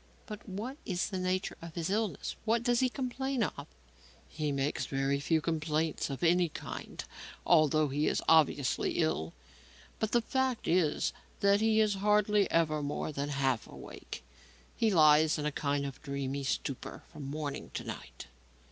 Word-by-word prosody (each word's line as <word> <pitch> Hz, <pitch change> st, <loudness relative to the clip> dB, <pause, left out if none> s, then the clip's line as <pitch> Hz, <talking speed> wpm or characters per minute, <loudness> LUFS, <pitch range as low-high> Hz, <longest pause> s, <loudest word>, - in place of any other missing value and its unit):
"But 210 Hz, -2 st, -9 dB
what 225 Hz, +9 st, -5 dB
is 180 Hz, -3 st, -1 dB
the 190 Hz, -3 st, -3 dB
nature 185 Hz, +1 st, -1 dB
of 165 Hz, -1 st, -9 dB
his 170 Hz, +1 st, -2 dB
illness? 215 Hz, -1 st, -1 dB
What 230 Hz, +1 st, +1 dB
does 240 Hz, -1 st, +3 dB
he 255 Hz, -, +3 dB
complain 265 Hz, -1 st, -2 dB
of?" 145 Hz, -7 st, -4 dB, 0.6 s
"He 150 Hz, -2 st, -2 dB
makes 140 Hz, +1 st, -1 dB
very 135 Hz, 0 st, 0 dB
few 160 Hz, +3 st, +1 dB
complaints 155 Hz, -1 st, -1 dB
of 135 Hz, +4 st, -5 dB
any 175 Hz, 0 st, +4 dB
kind -, -, -7 dB, 0.4 s
although 155 Hz, -2 st, +4 dB
he 145 Hz, +3 st, 0 dB
is -, -, 0 dB
obviously 150 Hz, -4 st, +3 dB
ill. 85 Hz, -, 0 dB, 0.7 s
But 220 Hz, -1 st, -1 dB
the 240 Hz, -, +4 dB
fact 260 Hz, -1 st, -1 dB
is 170 Hz, -3 st, +2 dB, 0.3 s
that 200 Hz, +1 st, +4 dB
he 220 Hz, 0 st, +3 dB
is 215 Hz, -1 st, +3 dB
hardly 210 Hz, 0 st, +3 dB
ever 155 Hz, -2 st, +2 dB
more 145 Hz, +1 st, -3 dB
than 140 Hz, 0 st, -3 dB
half 135 Hz, -4 st, 0 dB
awake. -, -, -9 dB, 0.5 s
He 225 Hz, -2 st, +2 dB
lies 155 Hz, -2 st, +5 dB
in 150 Hz, -, -3 dB
a 150 Hz, -, +1 dB
kind 140 Hz, 0 st, -1 dB
of 135 Hz, -2 st, -7 dB
dreamy 140 Hz, -1 st, -3 dB
stupor 135 Hz, -1 st, -3 dB
from 150 Hz, -4 st, -8 dB
morning 145 Hz, -1 st, -4 dB
to -, -, -3 dB
night." -, -, -8 dB
160 Hz, 165 wpm, -31 LUFS, 145-210 Hz, 0.7 s, lies